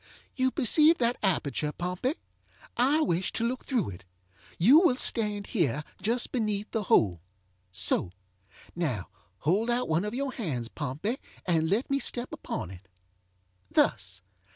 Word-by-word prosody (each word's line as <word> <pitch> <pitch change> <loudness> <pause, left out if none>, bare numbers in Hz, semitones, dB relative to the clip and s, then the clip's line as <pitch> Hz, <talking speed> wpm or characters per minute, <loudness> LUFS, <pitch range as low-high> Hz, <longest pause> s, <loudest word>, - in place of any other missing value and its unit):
ŌĆ£You 260 -1 +1
perceive 310 +5 +5
that 240 0 +1
aperture, 150 -6 0
Pompey. 180 - -2 0.6
I 275 +6 +3
wish 175 - 0
to 230 - -1
look 255 +2 -3
through 235 - -1
it. 90 +1 -11 0.5
You 250 - +7
will 345 -8 +4
stand 210 -5 +1
here 150 - +1 0.2
just 235 +5 -1
beneath 215 -4 -1
the 220 -3 -2 0.9
holeŌĆöso. 95 -2 +2 0.6
Now, 130 - -2 0.3
hold 200 +10 +1
out 240 +1 +1
one 160 +3 +1
of 210 +3 -4
your 275 +1 -2
hands, 135 - -4
Pompey, 155 - -3 0.3
and 160 -3 +1
let 215 +7 +1
me 275 - +2
step 245 -2 -1
upon 95 0 -5 0.9
itŌĆöthus. 90 0 +1
210 Hz, 135 wpm, -28 LUFS, 160-250 Hz, 0.9 s, You